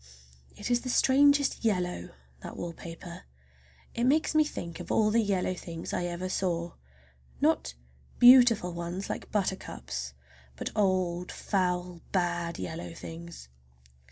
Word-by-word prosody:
It 205 Hz, +4 st, -4 dB
is 240 Hz, 0 st, +3 dB
the 255 Hz, -, -5 dB
strangest 285 Hz, +2 st, +4 dB
yellow, 180 Hz, -, -1 dB, 0.3 s
that -, -, -8 dB
wallpaper! 170 Hz, 0 st, -8 dB, 0.7 s
It 235 Hz, -, 0 dB
makes 305 Hz, +5 st, +3 dB
me 310 Hz, 0 st, +5 dB
think 170 Hz, -, -6 dB
of -, -, -6 dB
all 215 Hz, -1 st, +3 dB
the 230 Hz, +1 st, +4 dB
yellow 195 Hz, -3 st, 0 dB
things 165 Hz, -2 st, -7 dB
I 175 Hz, -, -1 dB
ever 175 Hz, +1 st, -3 dB
saw—not 65 Hz, -, -3 dB, 0.4 s
beautiful 245 Hz, -7 st, +7 dB
ones 175 Hz, +3 st, -4 dB
like -, -, -6 dB
buttercups, 185 Hz, -, -3 dB, 0.4 s
but -, -, -4 dB
old 185 Hz, -3 st, +1 dB
foul, 180 Hz, -3 st, -1 dB
bad 175 Hz, -2 st, -1 dB
yellow 165 Hz, +1 st, -6 dB
things. 165 Hz, -, -9 dB
180 Hz, 125 wpm, -29 LUFS, 170-215 Hz, 0.7 s, beautiful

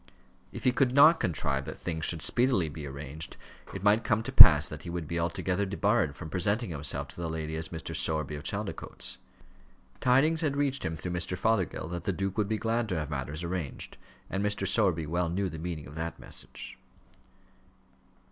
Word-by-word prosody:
If -, -, -8 dB
he 125 Hz, -, +4 dB
could 130 Hz, 0 st, +1 dB
not 155 Hz, +4 st, +7 dB
contrive 70 Hz, -4 st, 0 dB
that 75 Hz, -, -7 dB
things 80 Hz, -2 st, -3 dB
should 80 Hz, -2 st, 0 dB
speedily 120 Hz, -10 st, +2 dB
be 75 Hz, 0 st, -7 dB
arranged, 70 Hz, +3 st, -7 dB, 0.3 s
it 95 Hz, -, -7 dB
might 105 Hz, +2 st, +4 dB
come 110 Hz, -2 st, +1 dB
to -, -, -4 dB
pass -, -, +10 dB
that -, -, -8 dB
he -, -, -7 dB
would 85 Hz, -2 st, -4 dB
be 85 Hz, +2 st, -2 dB
altogether 90 Hz, +3 st, -1 dB
debarred 100 Hz, -5 st, +1 dB
from 80 Hz, -, -8 dB
presenting 100 Hz, +3 st, 0 dB
himself 75 Hz, -2 st, -2 dB
to -, -, -8 dB
the 85 Hz, -, -2 dB
lady 80 Hz, -1 st, -4 dB
as 80 Hz, 0 st, -2 dB
Mr. 80 Hz, -1 st, -6 dB
Sowerby 75 Hz, -2 st, +1 dB
of 75 Hz, -, -5 dB
Chaldicotes. -, -, -4 dB, 0.8 s
Tidings 150 Hz, +6 st, +3 dB
had 145 Hz, -3 st, 0 dB
reached 140 Hz, -1 st, 0 dB
him, 80 Hz, -, -2 dB
through 85 Hz, +3 st, -5 dB
Mr. 90 Hz, +1 st, -1 dB
Fothergill, 100 Hz, -7 st, 0 dB
that 85 Hz, 0 st, -5 dB
the -, -, +1 dB
duke 95 Hz, +1 st, -3 dB
would 105 Hz, -1 st, 0 dB
be 110 Hz, -, 0 dB
glad 115 Hz, +1 st, -1 dB
to 90 Hz, -, -1 dB
have 75 Hz, -1 st, -4 dB
matters 75 Hz, +3 st, -4 dB
arranged; 85 Hz, -5 st, -4 dB, 0.3 s
and 95 Hz, +1 st, -2 dB
Mr. 100 Hz, -1 st, 0 dB
Sowerby 95 Hz, -5 st, +2 dB
well 85 Hz, +2 st, -1 dB
knew 95 Hz, +3 st, -1 dB
the 80 Hz, -1 st, -7 dB
meaning 80 Hz, -2 st, -5 dB
of 70 Hz, -, -11 dB
that 80 Hz, +1 st, -4 dB
message. -, -, -8 dB
90 Hz, 195 wpm, -29 LUFS, 80-105 Hz, 0.8 s, pass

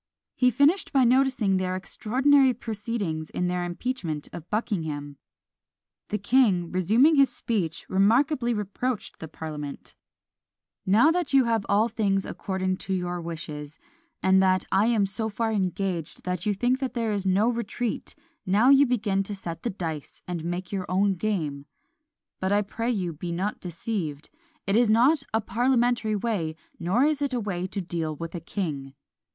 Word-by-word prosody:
He 250 Hz, -, +3 dB
finished 285 Hz, -, +3 dB
by 270 Hz, -2 st, +4 dB
noticing 245 Hz, -6 st, +3 dB
their 185 Hz, 0 st, -1 dB
extraordinary 260 Hz, +7 st, +2 dB
proceedings 210 Hz, -9 st, -4 dB
in 180 Hz, -, -2 dB
their 180 Hz, 0 st, -1 dB
impeachment 175 Hz, -, -3 dB
of 170 Hz, 0 st, -9 dB
Buckingham. 160 Hz, -10 st, -3 dB, 0.9 s
The 210 Hz, -, 0 dB
king, 200 Hz, -6 st, +2 dB
resuming 225 Hz, -, +4 dB
his 275 Hz, -1 st, +6 dB
speech, 180 Hz, -9 st, -2 dB
remarkably 240 Hz, +6 st, +3 dB
reproached 215 Hz, +2 st, -3 dB
the 160 Hz, -, -6 dB
parliament 150 Hz, -2 st, -7 dB, 0.9 s
Now 225 Hz, +12 st, +5 dB
that 350 Hz, -3 st, -1 dB
you 270 Hz, -, +7 dB
have 230 Hz, -3 st, 0 dB
all 210 Hz, +3 st, +4 dB
things 195 Hz, -4 st, 0 dB
according 185 Hz, -1 st, -2 dB
to 190 Hz, -, -3 dB
your 180 Hz, -1 st, -3 dB
wishes, 155 Hz, -3 st, -7 dB, 0.5 s
and 190 Hz, 0 st, +5 dB
that 185 Hz, -1 st, +3 dB
I 200 Hz, +3 st, +3 dB
am 225 Hz, -4 st, +3 dB
so 220 Hz, +3 st, -3 dB
far 225 Hz, +2 st, -1 dB
engaged 185 Hz, -4 st, -2 dB
that 180 Hz, +2 st, -3 dB
you 205 Hz, -, +1 dB
think 245 Hz, +5 st, +1 dB
there 240 Hz, -4 st, -2 dB
is 200 Hz, -2 st, -1 dB
no 195 Hz, +4 st, +3 dB
retreat, 235 Hz, -1 st, -3 dB, 0.3 s
now 210 Hz, +7 st, +3 dB
you 280 Hz, 0 st, +6 dB
begin 210 Hz, -5 st, +1 dB
to 200 Hz, +1 st, -4 dB
set 170 Hz, -4 st, -6 dB
the 240 Hz, -, -2 dB
dice, 160 Hz, -7 st, -6 dB
and 175 Hz, -3 st, -4 dB
make 175 Hz, +2 st, -4 dB
your 190 Hz, -2 st, -3 dB
own 195 Hz, +2 st, +2 dB
game. 160 Hz, -8 st, -2 dB, 0.7 s
But 190 Hz, +1 st, -1 dB
I 205 Hz, +1 st, +3 dB
pray 225 Hz, +4 st, -3 dB
you 185 Hz, -8 st, -1 dB
be 170 Hz, +3 st, -5 dB
not 190 Hz, +5 st, -2 dB
deceived; 170 Hz, -4 st, -4 dB, 0.3 s
it 195 Hz, -, +1 dB
is 235 Hz, -1 st, +4 dB
not 255 Hz, +8 st, +4 dB
a 220 Hz, -, +1 dB
parliamentary 240 Hz, 0 st, +1 dB
way, 195 Hz, -8 st, -2 dB, 0.2 s
nor 185 Hz, +9 st, +2 dB
is 300 Hz, 0 st, +1 dB
it 280 Hz, -3 st, 0 dB
a -, -, 0 dB
way 185 Hz, -4 st, -3 dB
to 195 Hz, -, -4 dB
deal 165 Hz, -3 st, -3 dB
with 165 Hz, +2 st, -7 dB
a 175 Hz, -, -4 dB
king. 150 Hz, -6 st, -4 dB
200 Hz, 165 wpm, -26 LUFS, 175-235 Hz, 0.9 s, you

